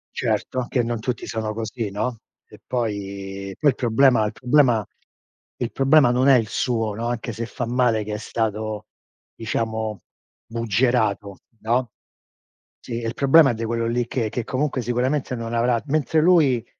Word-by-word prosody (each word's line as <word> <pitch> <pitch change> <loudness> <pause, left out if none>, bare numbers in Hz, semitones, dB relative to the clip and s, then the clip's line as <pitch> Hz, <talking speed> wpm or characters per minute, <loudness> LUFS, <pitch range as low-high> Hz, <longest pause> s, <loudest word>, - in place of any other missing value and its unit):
Certo, 130 - -1
anche 125 0 0
non 115 0 -2
tutti 120 +1 -3
sono 110 -1 -3
così, 110 -1 -4
no. 115 +3 -3 0.3
E - - -16
poi 100 -4 -4
poi 145 - +4
il - - -5
problema 120 -1 +3
il 105 - -3
problema 125 -4 +3 0.7
il 120 - -2
problema 135 -1 +4
non 125 +2 +2
è 135 - +8
il 110 - -2
suo, 115 -3 -1
no, 115 +3 -4
anche 120 -1 -3
se 115 +2 -4
fa 120 - -4
male 120 -2 +2
che 105 0 -4
è - - -4
stato 110 -1 -3 0.5
diciamo 110 -2 -3 0.5
buggerato, 110 -3 0 0.2
no, 120 +1 0 0.9
sì, 120 - -9
il 115 0 -3
problema 140 +1 +5
è - - -2
di 115 0 -5
quello 115 0 -1
lì 120 +1 -1
che 115 -3 -1
che 120 +2 -3
comunque 135 +1 -1
sicuramente 125 +3 -1
non 115 -1 -5
avrà 120 0 +2
mentre 155 +2 +1
lui, 155 -9 +4
115 Hz, 165 wpm, -23 LUFS, 110-125 Hz, 0.9 s, è